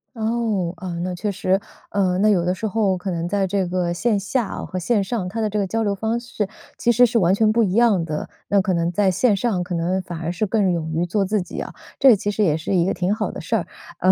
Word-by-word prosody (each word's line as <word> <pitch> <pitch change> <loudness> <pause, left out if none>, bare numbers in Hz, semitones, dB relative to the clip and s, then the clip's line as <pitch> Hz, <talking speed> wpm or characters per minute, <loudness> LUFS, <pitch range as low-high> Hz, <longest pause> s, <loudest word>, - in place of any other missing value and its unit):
哦， 220 -6 -1
啊， 185 +1 -6
那 180 0 -2
确 200 +4 -2
实， 190 0 +1 0.3
呃， 185 -3 +1
那 210 +2 +3
有 185 -5 +3
的 180 +1 0
时 220 - -5
候 200 -3 +1
可 185 +1 -4
能 170 0 -2
在 195 +1 +1
这 190 -1 0
个 175 -1 -1
线 210 +2 +1
下 215 +4 -1
啊 - - -5
和 185 - -4
线 205 +3 +1
上， 195 -3 -3
它 220 +5 -5
的 215 -1 0
这 210 +1 -1
个 195 - 0
交 225 +3 -1
流 200 -1 +1
方 220 +4 -1
式 220 -4 -3 0.3
其 235 - +2
实 245 +2 +6
是 230 0 +2
完 180 0 +3
全 215 +1 +3
不 230 +1 +3
一 190 -3 0
样 220 -6 +4
的。 155 -2 -4 0.2
那 200 - +3
可 185 -1 +1
能 170 0 0
在 190 +1 +2
线 210 +1 +2
上， 190 -4 0
可 175 0 -4
能 175 +3 0
反 175 -2 -7
而 170 +1 -2
是 200 +4 -1
更 195 -3 +2
勇 160 -2 -2
于 170 +2 +1
做 200 +3 0
自 205 +1 0
己 180 - -7
啊， - - -6 0.3
这 270 - +7
也 230 - +8
其 205 +1 -2
实 210 +1 0
也 155 -4 +2
是 160 - -3
一 175 -1 +3
个 - - +1
挺 180 +3 0
好 215 - -2
的 - - -7
事 - - -1
儿， - - -1 0.3
呃 - - +5
195 Hz, 300 characters per minute, -22 LUFS, 180-215 Hz, 0.3 s, 也